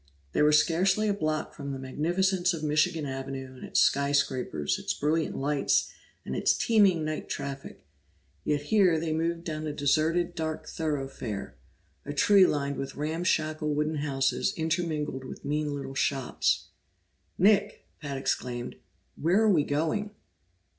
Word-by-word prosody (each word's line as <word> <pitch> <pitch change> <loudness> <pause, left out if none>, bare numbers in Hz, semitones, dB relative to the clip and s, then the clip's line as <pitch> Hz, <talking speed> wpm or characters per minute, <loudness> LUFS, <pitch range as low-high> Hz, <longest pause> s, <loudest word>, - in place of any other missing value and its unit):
They - - +1
were 150 0 +5
scarcely 185 +7 +3
a 205 - +2
block 155 -6 -2
from 140 -1 -6
the - - -4
magnificence 175 +7 0
of 155 - -7
Michigan 155 +1 +1
Avenue 135 -1 -5
and 130 - -12
its - - +2
skyscrapers, 135 - +1
its - - -2
brilliant 155 +1 0
lights, 140 +1 +1 0.3
and - - -4
its - - +2
teeming 195 -8 +3
night 155 0 -4
traffic, 135 - -6 0.6
yet 145 -1 0
here 180 -2 +3
they 160 -1 -2
moved 165 +1 -1
down 155 -2 -4
a 150 - -3
deserted 155 +5 +1
dark 160 -2 -4
thoroughfare, 135 -9 -4 0.5
a 145 +1 -6
street 205 -5 +6
lined 140 -1 -1
with 135 0 -5
ramshackle 155 -1 -1
wooden 150 +1 0
houses 135 -2 0
intermingled 160 -4 -1
with 130 - -9
mean 150 +1 -1
little 135 -1 -6
shops. 135 -1 0 0.7
"Nick!" 205 +2 +3 0.2
Pat 140 -3 -4
exclaimed. 125 -2 -3 0.4
"Where 175 +6 +2
are 215 - +5
we 160 -6 +4
going?" 160 +9 -1
155 Hz, 145 wpm, -28 LUFS, 140-170 Hz, 0.7 s, street